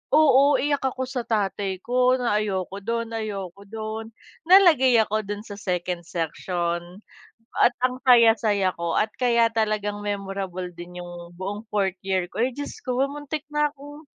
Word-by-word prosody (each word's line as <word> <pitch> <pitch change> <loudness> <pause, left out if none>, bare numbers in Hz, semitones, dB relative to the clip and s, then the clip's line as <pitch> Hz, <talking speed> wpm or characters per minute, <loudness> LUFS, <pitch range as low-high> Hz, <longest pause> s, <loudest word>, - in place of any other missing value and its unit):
oo, 285 -2 +6
iyak 285 0 0
ako 260 0 -1
sa 250 -3 -3
tatay 200 -3 -1
ko 250 +1 +3
na 235 -4 +1
ayoko 195 -1 -3
do'n 230 0 -2
ayoko 200 -3 -5
do'n, 220 +1 -5 0.4
nalagay 325 -10 +6
ako 215 0 -1
do'n 205 +1 -5
sa 205 - -7
second 180 -2 -2
section 175 +2 -3 0.6
at 240 - +5
ang 255 0 -1
saya-saya 225 -5 +5
ko 170 -1 -2
at 215 - +2
kaya 235 -2 +3
talagang 210 -2 0
memorable 195 -2 -4
din 180 +1 -9
yung 175 0 -10
buong 205 +4 -5
fourth 190 -2 0
year 185 -2 0
ko, 225 - -3
ay, 255 - 0
Diyos 285 0 -6
ko 255 0 -2
muntik 295 +1 -5
na 295 -1 +2
akong 290 +1 -12
215 Hz, 155 wpm, -24 LUFS, 190-250 Hz, 0.6 s, oo